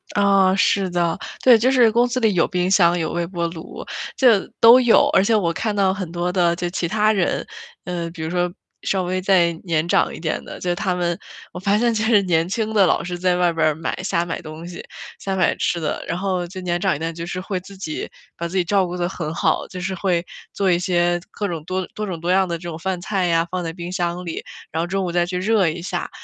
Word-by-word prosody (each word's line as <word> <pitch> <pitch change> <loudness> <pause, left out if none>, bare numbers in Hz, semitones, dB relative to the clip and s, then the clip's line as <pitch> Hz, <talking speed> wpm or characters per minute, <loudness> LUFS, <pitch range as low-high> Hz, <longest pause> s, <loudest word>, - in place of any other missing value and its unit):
啊， 195 -2 +3
是 195 -1 +2
的。 175 -2 0 0.3
对， 250 -3 +8
就 245 +4 +2
是 245 -4 +5
公 240 +2 +3
司 250 +1 -1
里 220 -4 +2
有 175 - +3
冰 180 -1 0
箱， 175 -3 +4
有 160 - -2
微 175 0 -1
波 170 -1 -2
炉， 165 +1 -9 0.3
这 235 -7 +5
都 230 +2 +9
有， 240 -2 +5
而 190 - +5
且 225 - +2
我 175 -6 +1
看 215 +5 -2
到 195 -2 +2
很 190 -4 -5
多 175 +1 -1
的 175 -2 +2
就 175 0 -2
其 175 - -2
他 215 +3 +2
人， 190 -4 0 0.4
呃， 175 -2 -3
比 165 -1 -9
如 160 - -3
说， 175 0 0 0.3
稍 190 -1 0
微 185 +1 -2
再 180 -3 +3
年 165 -2 0
长 - - +2
一 - - -8
点 160 -1 -2
的， - - -9
就 175 -1 -1
他 185 -1 -1
们 175 -1 -1 0.4
我 180 - -6
发 200 +2 +2
现 235 +1 +2
其 215 - -1
实 220 -1 +5
年 170 -2 +1
轻 220 +2 -2
的 200 -3 +5
老 - - +2
师 175 0 -4
在 180 0 +1
外 175 -1 +2
边 155 -2 +1
买 165 - -3
瞎 170 -2 0
买 165 - -4
东 155 +2 -9
西， 175 -1 -8 0.4
瞎 195 -1 -3
买 185 - +2
吃 170 - 0
的。 155 - -3
然 170 - -2
后 185 -2 -1
就 185 +2 -8
年 175 -1 -1
长 190 -4 +2
一 - - -6
点， 165 +1 -3
就 165 +1 -6
是 185 - -4
会 185 0 -3
自 195 +2 -13
己 160 -5 -5 0.3
把 170 - -4
自 185 +3 -4
己 185 - +3
照 190 +1 +2
顾 175 +1 -5
得 175 -1 0
很 170 -4 -4
好， - - +1
就 185 - -8
是 190 +2 -3
会 180 -2 0 0.3
做 195 -1 0
一 175 - +2
些 175 -1 +1
各 210 -1 -3
种 165 -5 -5
多 185 +2 -3
多 215 - -4
种 175 -4 -4
多 170 +2 -1
样 190 0 +3
的 170 -1 -2
这 165 - -15
种 165 -2 -5
饭 185 +1 -2
菜 185 0 -1
呀， 165 0 +2
放 180 -1 -2
在 165 - -3
冰 175 +1 -7
箱 175 0 -2
里， 165 - -5 0.3
然 160 - -1
后 170 - -2
中 195 +1 -1
午 175 - -2
再 175 0 +2
去 180 0 -3
热 200 0 +2
一 160 +2 -5
下。 180 - -3
180 Hz, 275 characters per minute, -21 LUFS, 170-195 Hz, 0.4 s, 都